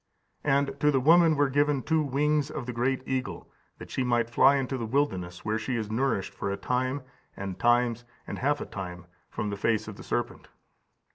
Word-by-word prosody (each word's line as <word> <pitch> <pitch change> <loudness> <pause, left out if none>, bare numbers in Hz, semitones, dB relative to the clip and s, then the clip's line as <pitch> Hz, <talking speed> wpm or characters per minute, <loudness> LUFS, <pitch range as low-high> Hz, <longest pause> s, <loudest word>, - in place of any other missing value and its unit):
And 140 -1 +1
to 150 - +4
the 135 -2 +3
woman 165 +3 +6
were 145 0 +3
given 145 0 +1
two 160 -1 +2
wings 150 +1 +1
of 150 -4 -5
the 125 - -4
great 130 +2 0
eagle, 130 0 -3 0.3
that - - -11
she 130 - 0
might 120 -1 +1
fly 135 +4 +6
into 135 -1 -1
the 115 -3 -3
wilderness, 95 -10 -1
where 110 +1 0
she 115 +3 -2
is 110 -2 -3
nourished 115 -4 0
for 100 - -3
a 100 - -2
time, 130 +5 -1 0.3
and 95 -1 -5
times, 120 0 +2 0.2
and - - -6
half 145 +2 +1
a - - -3
time, 90 -3 -7 0.2
from 105 -1 -3
the 100 - -4
face 110 +1 0
of 105 - -8
the - - -10
serpent." - - -3
130 Hz, 205 wpm, -28 LUFS, 110-140 Hz, 0.3 s, woman